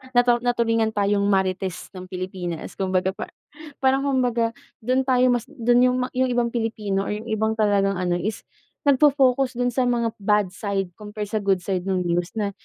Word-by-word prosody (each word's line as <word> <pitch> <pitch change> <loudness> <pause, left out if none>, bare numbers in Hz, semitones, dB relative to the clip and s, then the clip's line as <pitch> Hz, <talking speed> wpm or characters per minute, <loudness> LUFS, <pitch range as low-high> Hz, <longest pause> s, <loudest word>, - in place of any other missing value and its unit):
natu 245 0 +5
natulingan 230 -2 +1
tayong 205 -1 +1
Marites 190 -2 -1
ng 185 - -7
Pilipinas 185 -2 -5
kumbaga 185 -1 0
pa - - -7 0.5
parang 270 0 +2
kumbaga 245 -4 +1 0.3
dun 255 +3 +2
tayo 255 -1 +4
mas 240 -2 +1
dun 240 +1 +2
yung 250 - +1 0.2
yung 260 0 +2
ibang 240 -1 +1
Pilipino 215 -4 -1
or - - -2
yung 220 +2 -8
ibang 220 0 0
talagang 200 -2 +2
ano 180 -1 0
is 210 +5 -4 0.4
nagfo-focus 270 -3 +3
dun 245 - +2
sa 255 +2 +1
mga 235 -2 +1
bad 210 0 +2
side 195 -2 -3
compare 210 0 -6
sa 215 - 0
good 195 -2 +1
side 185 -1 -2
nung 185 -1 0
news 175 0 -1
na 205 -1 -1
215 Hz, 175 wpm, -23 LUFS, 195-245 Hz, 0.5 s, natu